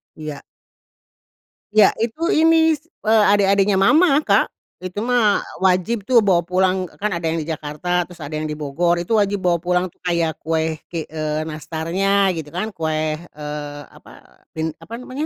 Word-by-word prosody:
Iya. 150 -2 -7 1.3
Iya. 215 -2 +7
Itu 240 +10 -1
ini 320 -2 +4
s 305 - -30 0.2
eee, 220 -1 +4
adik-adiknya 200 0 +3
mamah 295 - +5
Kak. - - +3 0.4
Itu 185 +2 -5
mah 230 -3 +2 0.2
wajib 190 +4 +2
tuh 240 +3 +4
bawa 185 -5 +3
pulang, 185 +2 +1 0.2
kan 210 +1 0
ada 170 - -5
yang 165 - -1
di 155 - -5
Jakarta 160 +3 -2
terus 175 0 -15
ada 155 +1 -6
yang 155 0 -3
di - - -2
Bogor. 160 +4 0
Itu 200 +6 -1
wajib 205 -1 +1
bawa 175 -2 +2
pulang 180 0 +1
tuh. - - -33
Kayak 170 -2 0
kue 160 0 -1
ki 165 -3 -4
eee, 155 -1 -2
nastarnya 180 +6 0
gitu 150 -2 -6
kan, 200 +5 -2
kue, 155 -1 -1
eee, 150 -2 -7
apa - - -17 0.4
bin 160 0 -2
apa 225 - -13
namanya, 265 +4 -4
180 Hz, 170 wpm, -20 LUFS, 160-210 Hz, 1.3 s, Iya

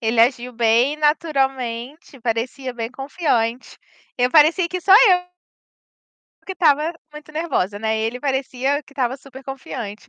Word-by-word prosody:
ele 225 -1 +1
agiu 245 +1 +2
bem 235 +5 +2
naturalmente, 270 -3 -1
parecia 250 +3 -3
bem 230 -1 -4
confiante. 260 -4 -2 0.4
Eu 250 0 +1
parecia 330 +3 +4
que 365 +1 -4
só 380 - +3
eu 375 -5 +6 1.2
que 380 - -5
estava 315 -2 +2 0.2
muito 300 0 -12
nervosa, 265 - -2
né, 220 0 -1
ele 225 +3 -3
parecia 270 +1 -1
que 280 - -20
estava 260 -1 -1
super 270 -1 -13
confiante, 245 -5 -7
265 Hz, 135 wpm, -21 LUFS, 235-300 Hz, 1.2 s, eu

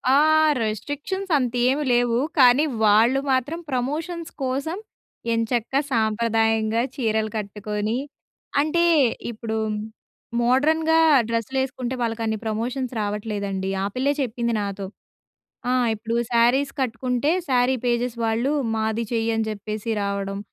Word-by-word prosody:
ఆహ్, 310 +1 +5
రిస్ట్రిక్షన్స్ 290 - -4
అంతేమి 250 +3 +1
లేవు. 240 -1 +2 0.2
కానీ 255 +3 +7 0.2
వాళ్ళు 225 +6 +5
మాత్రం 265 +6 0
ప్రమోషన్స్ 320 +7 -3
కోసం 275 +7 -2 0.6
ఎంచక్క 230 +2 -1 0.2
సాంప్రదాయంగా 225 0 +1
చీరలు 220 -3 0
కట్టుకొని 210 +2 -3 0.6
అంటే 340 +3 +1 0.5
ఇప్పుడు 220 0 -4 0.8
మోడ్రన్‌గా 315 +6 +3 0.3
డ్రెస్సులేసుకుంటే 255 +2 -2
వాళ్ళకన్ని 225 -1 -1
ప్రమోషన్స్ 245 +4 -2
రావట్లేదండి. 205 -2 -3
ఆ - - 0
పిల్లే 275 +3 +1
చెప్పింది 235 -2 -1
నాతో. 200 -1 -4 0.8
ఆ! - - +2 0.2
ఇప్పుడు 225 +2 -4 0.2
శారీస్ 245 +4 +3
కట్టుకుంటే 250 +3 0 0.2
శారీ 255 0 +3
పేజెస్ 240 0 0
వాళ్ళు, 230 +5 0 0.2
మాది 220 +1 -1
చెయ్యని 225 -1 0
చెప్పేసి 215 +1 -4
రావడం. 200 0 -2
235 Hz, 100 wpm, -23 LUFS, 220-265 Hz, 0.8 s, కానీ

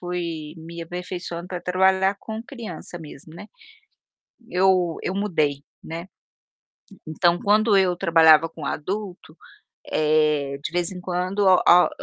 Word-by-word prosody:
fui 170 -4 -5
me 165 +1 -8
aperfeiçoando 175 0 -6
pra 180 -1 -5
trabalhar 190 +1 +2
com 220 +2 -7
criança 220 - -9
mesmo, 155 -1 -12
né. 170 - -10 1.0
Eu 180 -2 +2
eu - - -2
mudei, 155 -9 -1 0.2
né. 165 +2 -7 1.0
Então, 170 +2 +1
quando 210 0 +3
eu 185 -2 +2
trabalhava 165 -1 +5
com 160 -2 -10
adulto, 185 0 -5 0.5
eh, 150 -2 +1
de - - -4
vez 175 0 -1
em 180 - -8
quando, 180 +2 -3
o 185 -1 +5
a 180 +1 +7
175 Hz, 130 wpm, -23 LUFS, 160-190 Hz, 1.0 s, a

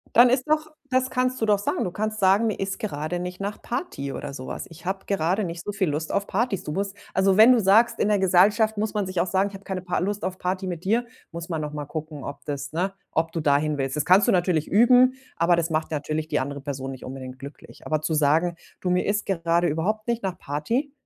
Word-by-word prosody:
Dann 240 +1 +8
ist 255 +3 +1
doch 310 0 +1 0.2
das 255 0 +1
kannst 255 0 0
du 225 - +1
doch 210 -1 +4
sagen. 200 - -1
Du 180 - -2
kannst 215 +3 -3
sagen: 195 +4 +4
„Mir 215 - -1
ist 195 0 -2
gerade 155 -3 -3
nicht 180 +1 -6
nach 200 +1 -4
Party 235 - -4
oder 145 - -6
so 130 - -7
was. - - -6
Ich 165 +2 -14
habe 190 +1 -2
gerade 195 +2 0
nicht 170 -1 -6
so 205 - -3
viel 200 -3 0
Lust 150 +2 -2
auf 200 - 0
Partys.“ 200 -3 -1
Du 150 - -4
musst 195 +3 -3 0.2
also, 190 0 +3
wenn 220 +4 +8
du 245 - +4
sagst, 215 +4 +4
in 210 - +2
der 210 -1 +3
Gesellschaft 205 +4 +4
muss 215 +1 -1
man 205 -3 0
sich 185 -2 -2
auch 180 - +1
sagen: 195 +2 +1
„Ich - - -15
habe 195 +1 -10
keine 190 -2 -4
Par 180 -1 -1
Lust 205 +3 -2
auf 185 0 -3
Party 185 +1 -2
mit 175 -1 -5
dir“, 235 +5 +1 0.2
muss 170 +1 -7
man 160 -3 -2
noch 150 -1 -4
mal 150 -1 -4
gucken, 155 -1 -6
ob 140 - -7
das, 145 -1 -5
ne 185 +4 -1 0.2
ob 165 0 0
du 165 - -2
da 145 -2 +3
hinwillst. 145 -2 -2
Das 150 - 0
kannst 185 +3 +5
du - - +5
natürlich 175 -4 +1
üben, 250 +4 +5 0.2
aber 170 +1 +3
das 165 0 -1
macht 155 0 -1
natürlich 155 +1 -3
die 150 - 0
andere 140 +1 -4
Person 135 -1 -5
nicht 130 - -10
unbedingt 130 -1 -8
glücklich. 140 +2 -12
Aber 155 -1 0
zu 155 +1 -1
sagen: 160 +4 +2 0.2
„Du, 180 - -1
mir 180 0 +2
ist 205 0 0
gerade 170 -2 +1
überhaupt 215 +9 -1
nicht 235 0 0
nach 190 -2 -3
Party“, 230 - -2
180 Hz, 255 wpm, -25 LUFS, 155-205 Hz, 0.2 s, Dann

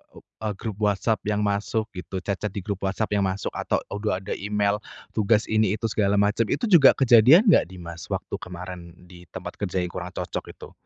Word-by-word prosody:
eee, 110 -1 -7
grup 105 0 -6
WhatsApp 105 +1 +1
yang 105 0 0
masuk 105 +2 -1
gitu 95 0 -6
chat-chat 100 +1 -3
di 100 - -4
grup 100 0 -4
WhatsApp 105 +3 -2
yang 100 -2 +2
masuk, 95 +1 -3
atau - - -2
udah 100 -2 -2
ada 100 - -6
email 105 0 0 0.3
tugas 110 0 +2
ini 110 -2 +2
itu 115 0 -3
segala 100 -2 +1
macam, 105 +3 +2
itu - - -2
juga 160 -7 +8
kejadian 130 - +7
nggak - - +4
di 95 - -12
Mas, 85 -1 -8
waktu - - -4
kemarin, 90 -1 -9 0.2
di 90 -1 -14
tempat - - -8
kerja 95 -2 -1
yang 90 - -4
kurang - - -7
cocok - - -5
itu? - - -12
105 Hz, 200 wpm, -24 LUFS, 95-110 Hz, 0.3 s, juga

